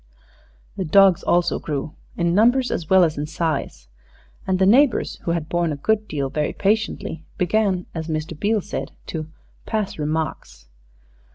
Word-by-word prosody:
The 190 Hz, -, -1 dB
dogs 190 Hz, +1 st, +5 dB
also 175 Hz, 0 st, +1 dB
grew, 150 Hz, 0 st, -4 dB, 0.2 s
in 170 Hz, 0 st, +1 dB
numbers 245 Hz, +6 st, +3 dB
as 160 Hz, -, -3 dB
well 190 Hz, -1 st, +6 dB
as 155 Hz, -3 st, 0 dB
in 150 Hz, -, -3 dB
size, 155 Hz, -, -3 dB, 0.6 s
and 190 Hz, -1 st, +2 dB
the 190 Hz, -, +3 dB
neighbors, 255 Hz, +6 st, +3 dB
who 170 Hz, -, 0 dB
had 165 Hz, -3 st, -2 dB
borne 175 Hz, -1 st, 0 dB
a -, -, -2 dB
good 215 Hz, +9 st, 0 dB
deal 140 Hz, -3 st, -3 dB
very 150 Hz, -1 st, -1 dB
patiently, 200 Hz, -5 st, -1 dB
began, 190 Hz, -1 st, +1 dB
as 160 Hz, -1 st, -5 dB
Mr. 155 Hz, 0 st, -3 dB
Beale 210 Hz, +6 st, 0 dB
said, -, -, -5 dB
to 155 Hz, -2 st, -5 dB, 0.4 s
"pass 215 Hz, -7 st, -2 dB
remarks." 150 Hz, -, -3 dB
170 Hz, 160 wpm, -22 LUFS, 155-200 Hz, 0.6 s, well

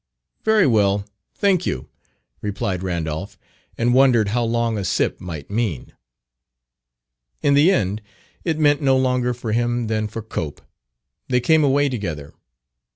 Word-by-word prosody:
"Very 220 Hz, -3 st, +4 dB
well; 100 Hz, -5 st, +2 dB, 0.3 s
thank 185 Hz, -4 st, +2 dB
you," 65 Hz, -, -3 dB, 0.5 s
replied 100 Hz, -3 st, -2 dB
Randolph, 90 Hz, +2 st, -4 dB, 0.4 s
and 120 Hz, +1 st, +2 dB
wondered 125 Hz, -5 st, +4 dB
how 120 Hz, +3 st, 0 dB
long 115 Hz, 0 st, 0 dB
"a -, -, -3 dB
sip" 90 Hz, -, 0 dB
might 80 Hz, -3 st, -7 dB
mean. 105 Hz, -, -2 dB, 1.5 s
In 145 Hz, -, +4 dB
the 145 Hz, +5 st, +5 dB
end 105 Hz, -, 0 dB, 0.4 s
it 165 Hz, -3 st, -1 dB
meant 145 Hz, -1 st, +3 dB
no 135 Hz, -2 st, +3 dB
longer 125 Hz, -1 st, +1 dB
for 115 Hz, -2 st, -5 dB
him 120 Hz, +1 st, 0 dB
than 110 Hz, -1 st, -1 dB
for 110 Hz, +1 st, -7 dB
Cope; 80 Hz, -8 st, -5 dB, 0.6 s
they 125 Hz, -1 st, +2 dB
came 155 Hz, +5 st, +3 dB
away 145 Hz, +1 st, +3 dB
together. 85 Hz, -, -5 dB
115 Hz, 140 wpm, -21 LUFS, 100-135 Hz, 1.5 s, the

